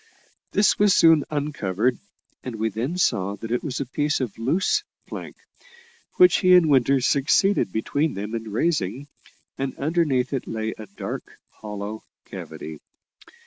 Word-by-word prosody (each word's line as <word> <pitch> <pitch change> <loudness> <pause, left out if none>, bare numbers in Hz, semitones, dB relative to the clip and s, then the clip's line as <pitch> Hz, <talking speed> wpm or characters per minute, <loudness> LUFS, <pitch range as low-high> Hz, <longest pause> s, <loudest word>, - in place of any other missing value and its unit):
This 205 0 +3
was 205 -2 +5
soon 165 -3 +5
uncovered, 125 -6 -1 0.4
and 125 -3 -5
we 110 +1 -1
then 120 - -3
saw 100 - +1
that 110 +3 -8
it 120 - 0
was 140 -5 -3
a - - -2
piece 145 +4 -1
of 125 -6 -3
loose 170 - +1 0.2
plank, - - -8 0.8
which 360 0 +6
he 185 -2 +5
and 165 -4 +5
Winter 135 0 +4
succeeded 140 - +2
between 140 - -1
them 105 +3 -5
in 115 -1 -4
raising, 135 - -1 0.5
and 135 0 -3
underneath 145 -4 0
it 135 - -3
lay 110 0 -3
a 110 - -10
dark 100 - -7
hollow 105 0 -7 0.2
cavity. 80 -1 -8
130 Hz, 145 wpm, -24 LUFS, 110-155 Hz, 0.8 s, which